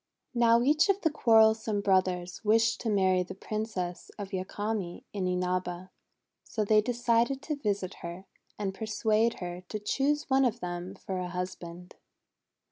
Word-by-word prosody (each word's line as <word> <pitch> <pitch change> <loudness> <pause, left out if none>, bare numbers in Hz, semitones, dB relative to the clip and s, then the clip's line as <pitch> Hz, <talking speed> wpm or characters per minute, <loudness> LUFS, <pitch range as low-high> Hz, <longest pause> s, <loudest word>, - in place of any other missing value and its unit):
Now 235 -1 +4
each 300 +7 +4
of 395 0 +3
the 320 - +2
quarrelsome 220 -5 +4
brothers 185 -2 +1
wished 225 +1 +3
to 230 - -1
marry 190 -3 +3
the 180 - -6
Princess 195 -4 -4
of 200 -2 -6
Yakami 195 0 -3
in 190 -3 -1
Inaba. 180 0 -2 0.5
So 215 - -2
they 215 +1 +5
decided 240 +3 +1
to 300 +1 -2
visit 200 -7 -2
her, 170 +3 -7 0.3
and 195 -2 -2
persuade 220 +2 +1
her 175 0 -5
to 215 - -3
choose 280 +8 0
one 270 -2 +4
of 240 -2 +1
them 175 +1 -5
for 190 -1 -5
a 180 - -3
husband. 180 -1 -6
205 Hz, 150 wpm, -29 LUFS, 185-230 Hz, 0.5 s, they